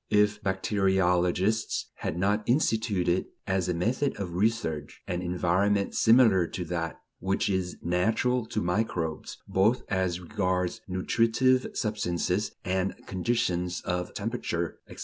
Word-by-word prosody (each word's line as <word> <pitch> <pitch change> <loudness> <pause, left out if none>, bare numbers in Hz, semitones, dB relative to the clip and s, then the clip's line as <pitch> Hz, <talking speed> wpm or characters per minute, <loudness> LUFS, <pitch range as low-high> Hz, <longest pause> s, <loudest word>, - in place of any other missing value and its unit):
If 105 0 +3
bacteriologists 95 0 +1
had 80 - -3
not 100 +4 +2
instituted, 110 - +1 0.2
as 95 -2 0
a - - +2
method 120 +11 0
of 90 -4 -4
research, 90 -7 -1
an 90 0 -2
environment 90 +3 +1
similar 110 -7 +5
to 90 +1 -5
that 85 -1 -3 0.2
which 95 +3 0
is 95 -2 -2
natural 110 +7 +1
to 105 - -2
microbes, 90 -4 -2
both 105 +6 +2
as 95 -2 0
regards 90 0 -1
nutritive 115 +7 +2
substances 105 -6 -1
and 95 +1 0
conditions 90 -3 -1
of 90 0 -2
temperature, 100 -7 -3
etc. - - -11
95 Hz, 120 wpm, -28 LUFS, 90-110 Hz, 0.2 s, similar